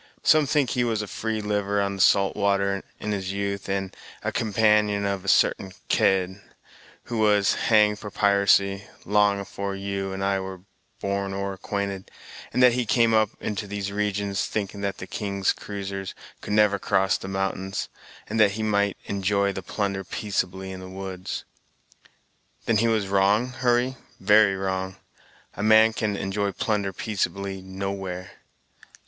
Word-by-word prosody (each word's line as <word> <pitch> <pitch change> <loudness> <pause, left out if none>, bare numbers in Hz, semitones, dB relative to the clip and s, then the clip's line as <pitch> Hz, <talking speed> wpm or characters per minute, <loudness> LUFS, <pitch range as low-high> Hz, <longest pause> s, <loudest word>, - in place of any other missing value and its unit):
Some 155 -2 +5
think 145 -4 +2
he 125 - +1
was 110 -3 0
a - - -7
free 110 +1 -3
liver 105 -1 0
on 100 0 0
the - - 0
salt 100 +1 +4
water, 100 -1 +1 0.2
in 105 - -3
his 95 -2 -2
youth, 100 0 -3
and 95 -1 -2 0.3
a - - -1
companion 105 -2 +2
of 100 -2 -2
a - - -10
sartain 95 0 +2 0.2
Kidd, 95 0 +2 0.6
who 115 -2 -4
was 105 -2 +4
hanged 105 -2 +3
for 105 - -7
piracy, 100 0 +3 0.2
long 105 -1 +3
afore 100 0 -4
you 95 0 -3
and 95 0 -4
I 100 0 +1
were 95 -1 -7 0.4
born 100 0 -2
or 100 0 -2
acquainted, 100 0 -4 0.4
and 125 - +2
that 125 -1 +7
he 125 -2 -1
came 115 +1 +3
up 110 -1 +4
into 105 0 -3
these 100 -1 -4
regions, 100 -1 -1
thinking 100 -1 -3
that 100 -1 -2
the - - -7
king's 100 0 -1
cruisers 100 -1 -6 0.3
could - - -4
never 105 -1 +4
cross 95 0 +2
the - - -7
mountains, 95 0 -2 0.4
and 110 +1 -2
that 105 -2 +5
he 110 +1 -3
might 100 -2 +1
enjoy 100 0 0
the 95 - -5
plunder 100 +1 -2
peaceably 95 -1 -3
in 95 - -7
the 95 0 -9
woods." 95 -1 -6 1.2
"Then 115 - +2
he 115 +2 +3
was 110 -3 +1
wrong, 100 +5 +3
Hurry; 125 0 +1 0.2
very 105 0 +5
wrong. 95 -1 -3 0.6
A - - -6
man 110 +1 +6
can 105 -2 -1
enjoy 100 +1 -1
plunder 100 0 -1
peaceably 100 -1 -3
nowhere." 95 -1 -5
100 Hz, 160 wpm, -25 LUFS, 95-105 Hz, 1.2 s, that